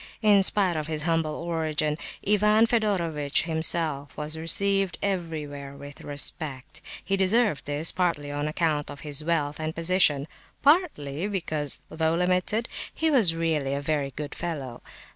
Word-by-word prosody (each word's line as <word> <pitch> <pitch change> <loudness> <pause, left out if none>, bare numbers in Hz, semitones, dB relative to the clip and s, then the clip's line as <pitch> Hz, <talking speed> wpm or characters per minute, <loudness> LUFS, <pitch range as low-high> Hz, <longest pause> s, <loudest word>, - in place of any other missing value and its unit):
In 205 -2 +6
spite 190 -2 +2
of 155 -1 -3
his 155 -2 -1
humble 165 -2 0
origin, 155 -3 -1 0.3
Ivan 210 +2 +4
Fedorovitch 175 - +1
himself 160 -4 -1
was 150 +1 -3
received 195 +3 +2
everywhere 155 -7 -3
with 140 0 -11
respect. 145 0 -3 0.2
He 195 - +1
deserved 195 -2 +2
this, 145 +3 0
partly 165 -6 -1
on 145 +1 -2
account 155 -1 0
of 140 - -9
his 150 0 -3
wealth 150 -3 0
and 155 0 -3
position, 165 -4 +3 0.4
partly 205 - +2
because, 155 -8 -2
though 160 0 0
limited, 180 +6 +1 0.2
he 320 0 0
was 210 - +4
really 155 -5 0
a - - -1
very 145 -1 -1
good 150 -1 -5
fellow. 140 -8 -5
160 Hz, 145 wpm, -26 LUFS, 145-185 Hz, 0.4 s, In